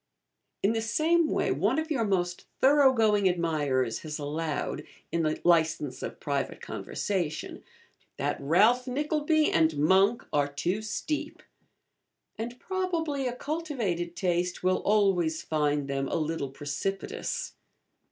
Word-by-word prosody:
In 205 +3 +3
the 225 - 0
same 320 +8 +2
way, - - 0
one 200 - +1
of 315 0 -2
your 270 -6 +1
most 180 -4 -1
thorough 275 0 +6
going 210 -5 +3
admirers 145 -9 0
has 150 -1 -5
allowed 150 +1 -3 0.3
(in 170 - +1
the 155 -1 0
licence 160 -5 +2
of - - -6
private - - -2
conversation) 170 -6 -3 0.5
that - - -1
'Ralph 215 - +4
Nickleby 300 +3 +1
and 160 -2 +3
Monk 190 +9 +3
are 145 -1 +3
too 170 +8 -2
steep;' 255 +8 -4 0.9
and 235 +3 -6
probably 330 -8 -1
a 245 - -3
cultivated 245 - -3
taste 180 0 -1
will 185 0 +3
always 195 -6 +2
find 150 -2 0
them 135 0 -1
a - - -2
little 155 -3 -2
precipitous. 195 - -4
185 Hz, 130 wpm, -28 LUFS, 155-250 Hz, 0.9 s, thorough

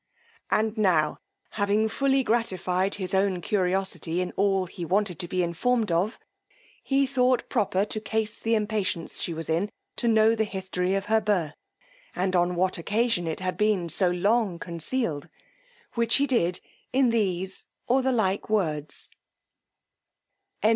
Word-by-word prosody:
And 220 0 +1
now 165 -7 +2 0.3
having 205 +1 +1
fully 270 +4 +1
gratified 190 -5 0
his 185 -2 -2
own 190 -1 +2
curiosity 185 -2 -1
in 180 0 -2
all 195 -2 +1
he 175 0 -8
wanted 190 +1 0
to 175 - -2
be 185 +1 0
informed 215 +5 0
of, 180 +7 +1 0.6
he 275 0 +2
thought 255 -2 +1
proper 200 -4 +1
to 215 +1 -3
case 220 0 -2
the 225 0 +1
impatience 210 -6 -1
she - - -1
was 165 0 -5
in 170 +6 0 0.3
to 240 - 0
know 220 0 +5
the 220 -1 +1
history 190 -2 -2
of 195 0 -1
her 220 +1 +3
birth, 180 -8 0 0.6
and 185 0 0
on 175 0 +2
what 185 0 +1
occasion 210 -1 0
it 160 +3 -3
had 185 -1 -2
been 210 -5 +1
so 185 +2 +2
long 195 +1 +1
concealed, 170 - -3 0.6
which 235 -1 +2
he 280 - +3
did 180 -10 +1 0.3
in 260 -2 +3
these 190 -4 -1 0.2
or 260 +2 +3
the 265 0 +1
like 205 -5 0
words: 155 -8 -1 1.5
CHAP. 215 - +5
195 Hz, 155 wpm, -26 LUFS, 180-220 Hz, 1.5 s, know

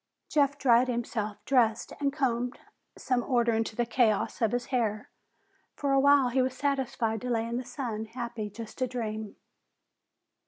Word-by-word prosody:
Jeff 285 -1 +2
dried 250 -2 +4
himself, 230 -4 -2
dressed 235 -5 +2
and 280 -1 +1
combed 250 -4 -1 0.4
some 250 -1 0
order 240 -2 +2
into 225 0 -1
the 240 - +1
chaos 230 -1 +1
of 225 -2 +3
his 245 0 -1
hair. 215 -4 -1 0.6
For 280 -1 -1
a 275 - +4
while 280 -2 +5
he 260 +2 +2
was 255 0 -1
satisfied 265 -6 -1
to 250 - -4
lay 230 -2 +1
in 235 +1 -2
the 255 - -3
sun, 230 -5 -4
happy 230 -2 -5
just 225 +4 -9
to 255 - +1
dream. 220 -4 -4
240 Hz, 165 wpm, -29 LUFS, 225-260 Hz, 0.6 s, while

